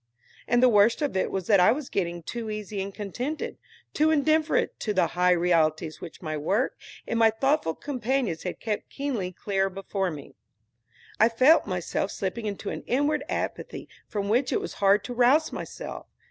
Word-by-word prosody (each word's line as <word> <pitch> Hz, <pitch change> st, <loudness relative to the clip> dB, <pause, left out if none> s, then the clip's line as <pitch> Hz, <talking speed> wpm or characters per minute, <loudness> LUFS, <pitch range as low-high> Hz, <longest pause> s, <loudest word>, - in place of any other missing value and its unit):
And 240 Hz, +1 st, +3 dB
the -, -, +8 dB
worst 220 Hz, +4 st, +4 dB
of 285 Hz, -, -1 dB
it 190 Hz, -, +1 dB
was 190 Hz, -2 st, -3 dB
that 200 Hz, -1 st, +5 dB
I 180 Hz, -, +6 dB
was 270 Hz, +2 st, -2 dB
getting 175 Hz, -3 st, -2 dB
too 230 Hz, +4 st, -5 dB
easy 210 Hz, -1 st, -4 dB
and 195 Hz, +1 st, -4 dB
contented, 245 Hz, +10 st, -5 dB, 0.3 s
too 310 Hz, +1 st, +3 dB
indifferent 310 Hz, +1 st, +2 dB
to 210 Hz, -2 st, -2 dB
the 185 Hz, -, +4 dB
higher 180 Hz, 0 st, +3 dB
realities 160 Hz, -2 st, +1 dB
which 175 Hz, +1 st, -10 dB
my 155 Hz, -1 st, -3 dB
work 195 Hz, -, 0 dB, 0.3 s
and 230 Hz, -, -1 dB
my 225 Hz, -1 st, +6 dB
thoughtful 245 Hz, -, 0 dB
companions 250 Hz, -, -2 dB
had 180 Hz, -, -5 dB
kept 215 Hz, -2 st, -3 dB
keenly 250 Hz, -10 st, -3 dB
clear 195 Hz, +1 st, -1 dB
before 195 Hz, 0 st, -3 dB
me. 150 Hz, -4 st, -9 dB, 0.9 s
I 220 Hz, -, +6 dB
felt 255 Hz, +7 st, +5 dB
myself 185 Hz, +1 st, -2 dB
slipping 205 Hz, +4 st, -3 dB
into 200 Hz, -2 st, -4 dB
an -, -, -5 dB
inward 290 Hz, +4 st, +1 dB
apathy -, -, -4 dB, 0.2 s
from 200 Hz, -2 st, -3 dB
which 245 Hz, +6 st, +2 dB
it 435 Hz, -, +2 dB
was 405 Hz, -, -6 dB
hard 200 Hz, +1 st, +4 dB
to 245 Hz, -, -5 dB
rouse 255 Hz, +6 st, +4 dB
myself. -, -, -7 dB
210 Hz, 180 wpm, -26 LUFS, 185-255 Hz, 0.9 s, the